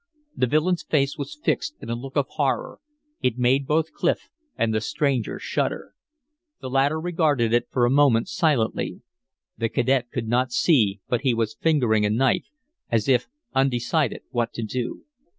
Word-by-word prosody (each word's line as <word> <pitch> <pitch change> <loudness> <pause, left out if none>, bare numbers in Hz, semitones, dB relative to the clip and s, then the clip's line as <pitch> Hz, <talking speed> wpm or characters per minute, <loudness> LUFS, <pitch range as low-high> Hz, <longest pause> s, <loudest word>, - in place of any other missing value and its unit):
The 125 - +1
villain's 160 +6 +1
face 140 -2 0
was 150 - -7
fixed 300 - 0
in - - -6
a - - 0
look 135 +3 -8
of 145 -2 +2
horror; - - -1 0.4
it 125 -2 0
made 130 +2 +2
both 160 +1 +1
Clif 175 - -1 0.3
and 115 -1 +1
the 110 - 0
stranger 135 -1 -1
shudder. - - -3 0.7
The 130 -2 -7
latter 140 +4 +2
regarded 155 -9 +1
it 120 0 +2
for 125 -2 +2
a 120 - +2
moment 135 -5 +4
silently. 140 -9 0 0.6
The 115 -1 0
cadet 125 0 +1
could 120 -2 -4
not 125 +2 +1
see, 110 - +3
but 120 - 0
he 130 -4 +2
was 115 -1 -1
fingering 125 -10 +2
a 105 - +2
knife, 120 +4 +1 0.4
as 115 -2 +1
if 125 -3 +3 0.3
undecided 135 +1 +1
what 120 -2 -1
to 115 - -4
do. 120 +2 -4
130 Hz, 170 wpm, -24 LUFS, 115-145 Hz, 0.7 s, moment